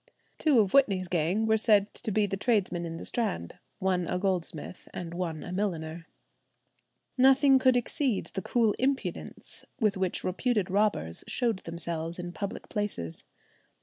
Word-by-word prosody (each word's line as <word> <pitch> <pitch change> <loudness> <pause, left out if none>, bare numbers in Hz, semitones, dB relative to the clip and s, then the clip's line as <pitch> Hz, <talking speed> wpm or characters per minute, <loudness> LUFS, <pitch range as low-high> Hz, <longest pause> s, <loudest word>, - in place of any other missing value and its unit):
Two 300 -5 +4
of 200 -3 +2
Whitney's 195 -10 +4
gang 175 +5 +1
were 220 0 +3
said 210 -2 +3
to - - -5
be 210 0 +2
the 195 -1 -2
tradesmen 195 -5 0
in 165 0 -5
the - - -7
Strand—one 180 - -2
a 180 - -1
goldsmith 180 -3 -3
and 170 -1 -5
one 170 -3 -3
a - - -7
milliner. 170 -4 -3 1.1
Nothing 270 +1 +6
could 255 -1 +4
exceed 245 -2 -1
the 190 - -2
cool 225 -2 +2
impudence 270 +1 -3 0.2
with 210 -4 +2
which 190 -2 -1
reputed 200 0 0
robbers 195 - 0
showed 230 -6 0
themselves 165 0 -4
in 175 -1 -5
public 200 +2 -5
places. 200 - -3
195 Hz, 150 wpm, -29 LUFS, 170-220 Hz, 1.1 s, Nothing